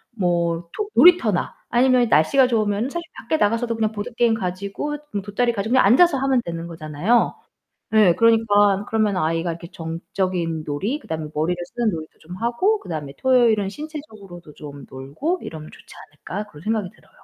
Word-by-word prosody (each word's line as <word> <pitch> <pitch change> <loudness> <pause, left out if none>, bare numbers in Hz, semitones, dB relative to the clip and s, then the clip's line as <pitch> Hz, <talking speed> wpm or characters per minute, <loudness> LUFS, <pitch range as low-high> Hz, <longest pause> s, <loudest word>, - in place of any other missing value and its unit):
뭐 170 -3 -1
토 420 - -2
놀이터나 295 - +4
아니면 250 0 +3
날씨가 225 - +4
좋으면은 220 0 0
사실 345 - -3 0.2
밖에 315 - -1
나가서도 230 0 +1
그냥 220 -1 0
보드게임 230 +2 0
가지고 200 +9 -4 0.3
돗자리 235 +4 0
가지고 220 +3 -2
그냥 260 - +5
앉아서 285 - +5
하면 270 -1 +2
되는 170 0 -5
거잖아요. 165 +7 0 0.6
네, 215 -5 +5
그러니까 205 -2 +3
그러면 215 -3 +1
아이가 165 +1 0
이렇게 170 +1 -8
정적인 165 0 -3
놀이, 200 - -2
그다음에 160 - -5
머리를 160 +4 -1
쓰는 235 +4 -1
놀이도 160 -5 -7
좀 180 +3 -10
하고 240 - 0
그다음에 150 - -6
토요일은 235 -6 +3
신체적으로도 215 - -10
좀 145 -2 -10
놀고 145 - -4
'이러면 155 -1 -8
좋지 - - -16 0.2
않을까' 185 +7 -6
그런 150 - -13
생각이 210 -1 -2
들어요. - - -25
205 Hz, 415 characters per minute, -22 LUFS, 170-240 Hz, 0.6 s, 그냥